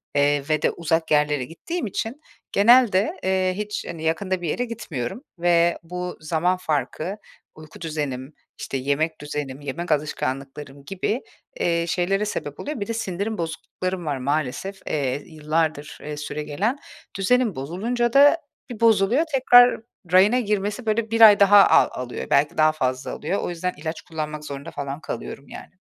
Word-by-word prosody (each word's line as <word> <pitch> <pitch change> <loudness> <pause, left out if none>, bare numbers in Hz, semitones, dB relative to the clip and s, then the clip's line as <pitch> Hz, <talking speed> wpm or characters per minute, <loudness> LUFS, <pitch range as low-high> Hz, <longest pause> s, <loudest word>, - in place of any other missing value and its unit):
eee, 145 0 +3
ve 155 - +1
de - - +2
uzak 165 -1 -1
yerlere 150 -3 +2
gittiğim 310 - -5
için 230 - -4 0.3
genelde, 215 -2 +5
eee, 185 -1 +1
hiç, 210 0 -4
hani, 165 -2 -7
yakında 180 +3 -1
bir 165 - -2
yere 245 - -1
gitmiyorum 195 - -5 0.2
ve 170 0 +3
bu 180 +1 -5
zaman 165 +3 0
farkı 155 - -2 0.4
uyku 155 +1 -13
düzenim, 145 -3 -4 0.3
işte 135 - -3
yemek 145 +4 -1
düzenim, 145 -2 -5
yemek 155 +5 -4
alışkanlıklarım 140 -1 -3
gibi, 195 +6 -2 0.4
eee, 170 -1 +1
şeylere 195 +4 0
sebep 145 -8 -5
oluyor. 295 -5 -4
Bir 200 - -3
de 230 - -2
sindirim 210 0 -3
bozukluklarım 175 +2 -4
var 145 -3 -1
maalesef, 145 +7 -2
eee, 140 -1 -1
yıllardır, 155 -1 -2
ııı, 150 0 -6
süregelen. 150 - -2 0.4
Düzenim 235 +1 +2
bozulunca 230 - -2
da 290 +4 +7 0.3
bir 235 - -7
bozuluyor, 225 +5 +4
tekrar 245 -3 +6 0.3
rayına 200 +7 +5
girmesi, 210 +1 -2
böyle, 220 +1 0
1 230 0 +1
ay 210 -2 +9
daha 200 0 +7
al - - +6
alıyor. 125 -1 -5
Belki 145 +2 +2
daha 155 0 +5
fazla 130 -4 -2
alıyor. 195 - -2
O - - -3
yüzden 180 +1 -3
ilaç 160 +1 -5
kullanmak 155 -2 -5
zorunda 140 +3 -7
falan 140 +2 -5
kalıyorum, 140 - -7
yani. 185 - -11
170 Hz, 155 wpm, -23 LUFS, 150-205 Hz, 0.4 s, ay